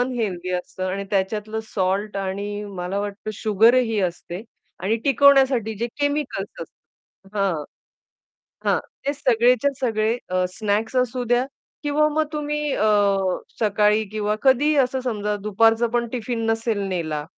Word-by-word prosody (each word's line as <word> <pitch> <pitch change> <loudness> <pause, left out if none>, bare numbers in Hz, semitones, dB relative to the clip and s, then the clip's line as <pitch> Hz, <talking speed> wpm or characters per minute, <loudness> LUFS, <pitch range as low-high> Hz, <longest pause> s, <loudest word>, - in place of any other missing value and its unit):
Unhealthy 215 -8 -2
असतं 185 +1 -6
आणि 200 +1 -3
त्याच्यातलं 210 +3 -1
सॉल्ट 200 +1 -1
आणि 200 +2 -3
मला 180 +2 -2
वाटतं 205 +1 -4
शुगरही 225 +3 +3
असते 175 +1 -3 0.4
आणि 210 +4 +1
टिकवण्यासाठी 270 -5 +4
जे 235 - 0
केमिकल्स 285 - -2
असतात 195 +4 -18
हां. 190 -6 +1 1.0
हां, - - +3 0.3
ते 285 - +2
सगळेच्या 250 0 +3
सगळे 225 -2 +1
अ, 185 0 +1
स्नॅक्स 215 +3 -1
असू 250 0 0
द्या 245 +2 +2 0.4
किंवा 300 +1 +2
मग 310 +1 +1
तुम्ही 300 -1 -2
अ, 215 - +1 0.7
सकाळी 210 0 +3
किंवा 210 0 -1
कधीही 280 +3 +4
असं 260 +1 -3
समजा 210 -4 -1
दुपारचं 225 +3 +3
पण 235 0 0
टिफिन 235 -1 -2
नसेल 225 -1 0
नेला 155 -5 -2
220 Hz, 130 wpm, -23 LUFS, 200-250 Hz, 1.0 s, टिकवण्यासाठी